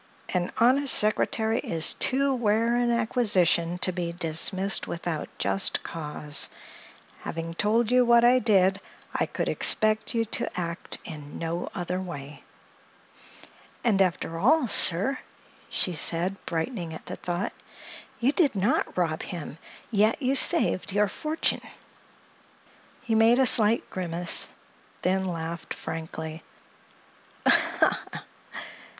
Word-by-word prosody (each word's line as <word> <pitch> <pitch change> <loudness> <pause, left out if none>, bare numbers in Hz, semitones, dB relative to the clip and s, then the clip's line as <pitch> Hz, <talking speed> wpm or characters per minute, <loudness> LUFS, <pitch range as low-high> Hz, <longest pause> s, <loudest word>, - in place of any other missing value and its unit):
"An 180 -1 -2
honest 260 +4 +4
secretary 220 +1 +2
is 165 -2 +1
too 275 +1 +1
rare 230 0 +1
an 240 0 +1
acquisition 200 -8 +1
to 185 - +3
be 175 -1 -4
dismissed 180 +3 -1
without 170 -2 -4
just 195 - 0
cause. 150 -2 -1 0.7
Having 165 0 -6
told 220 +5 +1
you 250 0 +5
what 235 -1 +4
I 250 +1 +5
did, 195 -5 +2 0.3
I - - -1
could - - -4
expect 215 +1 +1
you 230 0 +1
to 210 - -2
act 170 0 -4
in 150 -3 -9
no 170 +1 -4
other 180 0 -3
way." 145 -5 -9 1.4
"And, 210 -5 +2
after 170 -2 -1
all, 270 - +3
sir," 205 +7 +4 0.5
she 180 - +1
said, 170 +4 +1
brightening 170 -1 -4
at - - -11
the - - -6
thought, 175 +1 -4 0.7
"you 245 +3 +2
did 295 - +1
not 200 +2 -1
rob 165 -3 -1
him! 165 -3 -8 0.3
Yet 215 +1 +2
you 265 -2 0
saved 275 - +2
your 205 0 +2
fortune." 310 +9 -2 1.4
He 225 - -2
made 225 +2 +4
a 265 - +4
slight 225 -1 +4
grimace, 175 -1 +2
and - - -20 0.5
then 190 +1 0
laughed 170 -2 -5
frankly. 160 0 -7
190 Hz, 120 wpm, -26 LUFS, 170-235 Hz, 1.4 s, you